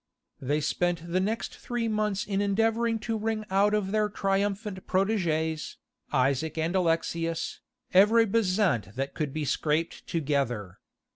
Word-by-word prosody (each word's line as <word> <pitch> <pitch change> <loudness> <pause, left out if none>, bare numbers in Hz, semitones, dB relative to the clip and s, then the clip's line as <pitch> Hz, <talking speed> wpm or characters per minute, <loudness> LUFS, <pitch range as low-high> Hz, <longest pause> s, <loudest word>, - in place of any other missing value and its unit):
They 145 +3 0
spent 170 +1 -1
the 185 - +2
next 215 +4 -2
three 240 -1 -2
months 210 -2 0
in 200 -1 -1
endeavouring 225 +3 +1
to 225 - -2
wring 220 0 -2
out 205 +2 +3
of 195 -2 -1
their 215 0 +2
triumphant 200 0 -1
protégés, 165 -6 0 0.4
Isaac 140 +4 +1
and 165 +3 0
Alexius, 165 -1 0 0.3
every 215 +5 +6
bezant 190 - +1
that 135 +1 -3
could 150 -3 -2
be 155 +1 -3
scraped 155 +4 -1
together. 135 - -1
185 Hz, 135 wpm, -28 LUFS, 155-210 Hz, 0.4 s, every